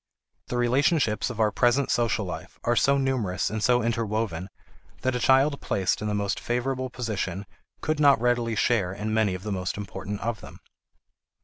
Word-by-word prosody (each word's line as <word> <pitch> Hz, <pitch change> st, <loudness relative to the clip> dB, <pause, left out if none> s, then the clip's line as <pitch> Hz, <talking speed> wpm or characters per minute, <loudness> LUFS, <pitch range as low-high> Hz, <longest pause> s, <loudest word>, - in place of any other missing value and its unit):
The 125 Hz, -, -3 dB
relationships 120 Hz, -, +2 dB
of 120 Hz, -3 st, -7 dB
our 110 Hz, -1 st, +3 dB
present 120 Hz, +6 st, +2 dB
social 110 Hz, -3 st, +1 dB
life 80 Hz, -3 st, -7 dB
are 120 Hz, -, +2 dB
so 140 Hz, +3 st, +3 dB
numerous 120 Hz, -10 st, 0 dB
and 110 Hz, 0 st, -3 dB
so 125 Hz, +1 st, +3 dB
interwoven 110 Hz, -5 st, -2 dB, 0.5 s
that 130 Hz, -, 0 dB
a 125 Hz, -, -1 dB
child 135 Hz, +3 st, +3 dB
placed 95 Hz, -1 st, 0 dB
in 105 Hz, -, -2 dB
the 105 Hz, -, -1 dB
most 100 Hz, -1 st, -1 dB
favorable 130 Hz, +2 st, -2 dB
position 105 Hz, -6 st, -3 dB, 0.4 s
could 155 Hz, -1 st, -1 dB
not 140 Hz, -4 st, +6 dB
readily 120 Hz, -1 st, +1 dB
share 105 Hz, -6 st, +1 dB
in 105 Hz, +2 st, -3 dB
many 110 Hz, -4 st, +2 dB
of 90 Hz, -, -8 dB
the 105 Hz, -, -4 dB
most 95 Hz, -1 st, -2 dB
important 100 Hz, 0 st, -5 dB
of 115 Hz, -4 st, -3 dB
them. -, -, -12 dB
115 Hz, 180 wpm, -26 LUFS, 100-125 Hz, 0.5 s, not